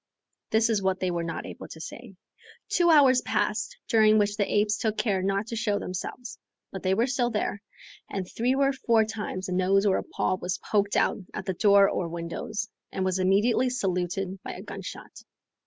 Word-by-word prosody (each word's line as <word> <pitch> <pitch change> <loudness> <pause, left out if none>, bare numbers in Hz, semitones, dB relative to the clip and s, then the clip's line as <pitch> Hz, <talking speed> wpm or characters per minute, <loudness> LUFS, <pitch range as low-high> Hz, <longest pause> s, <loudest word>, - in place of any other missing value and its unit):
this 220 +1 +3
is 210 -3 +1
what 190 -1 0
they 185 -1 0
were 170 -1 -1
not 165 -1 -4
able - - -8
to 160 - -11
say. 210 +5 -9 0.5
Two 345 -1 +3
hours 270 -5 +6
passed, 215 +2 -1
during 215 -1 +5
which 205 -1 +2
the 205 -2 -1
apes 210 0 +2
took 220 -1 -1
care 195 -5 +1
not 195 +2 0
to 230 - -5
show 215 -2 0
themselves, 205 +6 -6 0.3
but 190 - -6
they 190 0 +1
were 230 +4 +2
still 250 -2 0
there, 210 -2 -2 0.5
and 190 -2 -4
three 245 +6 0
or 275 0 +2
four 230 -4 +2
times 210 -4 -5
a - - -5
nose 190 +2 +2
or 195 -2 +3
a - - -5
paw 185 - -1
was 180 0 -3
poked 205 -1 0
out - - +2 0.2
at - - -5
the 190 - -1
door 200 +1 +5
or 175 - -1
windows, 170 +6 -4 0.2
and 190 - -2
was 185 0 0
immediately 210 +7 +3
saluted 190 -4 -2
by - - -6
a - - -9
gun - - -7
shot. - - -9
205 Hz, 205 wpm, -27 LUFS, 185-225 Hz, 0.5 s, hours